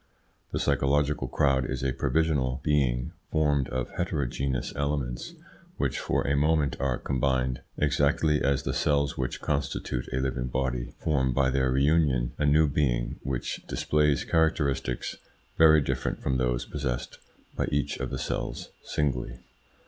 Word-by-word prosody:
The - - -1
psychological 70 0 +1
crowd 65 -1 +1
is 65 -1 -3
a 65 -1 +1
provisional 70 -1 +1
being 65 -5 +1 0.2
formed 75 -3 +2
of 65 -1 -3
heterogeneous 70 -5 -2
elements, 70 -4 -2 0.4
which - - -1
for - - 0
a 70 - +2
moment 75 -2 +2
are 65 -1 0
combined, 65 -1 0 0.2
exactly 75 +1 +2
as 70 -1 +1
the - - -2
cells 70 -1 +1
which 65 -2 -3
constitute 70 -3 -2
a 65 - -1
living 65 -1 -1
body 60 -1 -2
form 65 -5 +1
by 65 0 +2
their 65 -1 +2
reunion 70 -2 +2
a 75 - +2
new 75 +2 +5
being 65 -4 0
which 65 -3 -3
displays 75 -1 +1
characteristics 70 -6 0 0.4
very 80 -1 +7
different - - -2
from 65 -1 0
those 60 -1 0
possessed 65 -5 -4 0.4
by - - -1
each 70 0 0
of - - -3
the - - -3
cells - - -4
singly. 60 -4 -2
70 Hz, 140 wpm, -27 LUFS, 65-75 Hz, 0.4 s, very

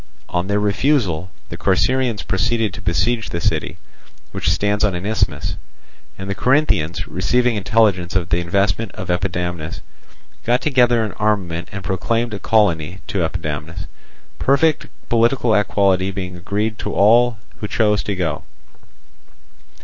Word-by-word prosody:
On 90 +1 -1
their 100 +1 +1
refusal 100 - +1 0.2
the - - -6
Corcyraeans 120 +3 +1
proceeded 110 +2 0
to 100 - -8
besiege 110 +5 0
the 85 - -3
city, - - -1 0.5
which - - -1
stands 105 0 +1
on 100 -4 +2
an 90 +2 -5
isthmus; 110 +1 -1 0.6
and 95 - -6
the 100 - -1
Corinthians, 105 - +1
receiving 120 +6 +1
intelligence 100 -4 +2
of 90 -3 0
the 85 - +2
investment 100 +5 0
of 95 - -7
Epidamnus, 90 -2 -3 0.6
got 120 +2 +2
together 125 -4 +3
an 110 - -3
armament 95 -6 -1
and 100 -2 -6
proclaimed 115 +6 -1
a 100 - -4
colony 90 -6 +1
to 100 - -2
Epidamnus, 80 0 -4 0.5
perfect 145 +3 +2 0.2
political 120 0 +2
equality 100 -2 +2
being 95 -2 -5
guaranteed 105 +3 -2
to 105 +2 -4
all 115 +3 +5 0.2
who 105 - -3
chose 105 -1 +2
to 100 -2 -3
go. 85 -5 -2
100 Hz, 140 wpm, -20 LUFS, 90-115 Hz, 0.6 s, all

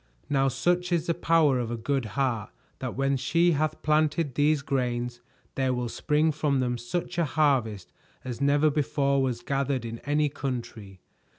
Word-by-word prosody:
Now 135 -1 +3
such 175 +7 0
is 170 -2 +1
the 170 - +1
power 160 -5 +3
of 120 -2 -2
a 120 - -3
good 135 +2 -1
heart 120 -6 0 0.3
that 130 -2 -4
when 135 0 +1
she 165 +7 +2
hath 155 0 -1
planted 155 -1 +1
these 145 +1 +2
grains, 120 -3 -2 0.3
there 130 -1 0
will 125 -1 -2
spring 150 +5 +1
from 145 -2 0
them 125 -1 0
such 170 +8 -3
a 170 - +3
harvest 125 - 0 0.3
as 125 0 -6
never 145 +2 +3
before 140 -1 +1
was 125 -3 -1
gathered 135 -3 -1
in 115 0 -6
any 150 +1 +1
country. 120 - -6
140 Hz, 170 wpm, -27 LUFS, 125-150 Hz, 0.3 s, Now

